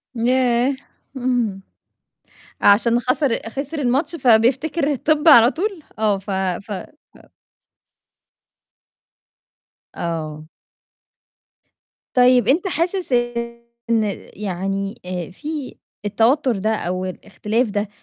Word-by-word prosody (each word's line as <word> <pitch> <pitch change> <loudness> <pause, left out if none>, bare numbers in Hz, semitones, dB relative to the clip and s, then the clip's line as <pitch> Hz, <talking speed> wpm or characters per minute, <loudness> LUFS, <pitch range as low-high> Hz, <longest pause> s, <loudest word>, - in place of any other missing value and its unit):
ياه! 250 +2 +2 0.4
إمم. 240 -6 -1 1.0
عشان 230 +4 +4
خَسر 255 0 +1
خِسر 285 +5 -5
الماتش 275 +6 0
فبيفتكر 270 +5 +2
الطِب 300 +3 +1
على 240 -3 +8
طول 375 -1 -3 0.2
آه، 210 -2 +2
ف 200 +1 -7
ف 190 +2 -2
ف 200 - -10 2.7
آه. 155 -2 -4 1.7
طيب 250 -2 +5
أنت 325 +9 +2
حاسس 360 -2 -1 0.8
إن 225 -1 +3 0.3
يعني 195 +1 -3
آآ، 180 -1 -5
في 295 - -6 0.3
التوتّر 235 +4 +2
ده 215 +3 0
أو 185 -2 -3
الإختلاف 215 +5 -2
ده، 205 0 -2
235 Hz, 90 wpm, -20 LUFS, 200-280 Hz, 2.7 s, على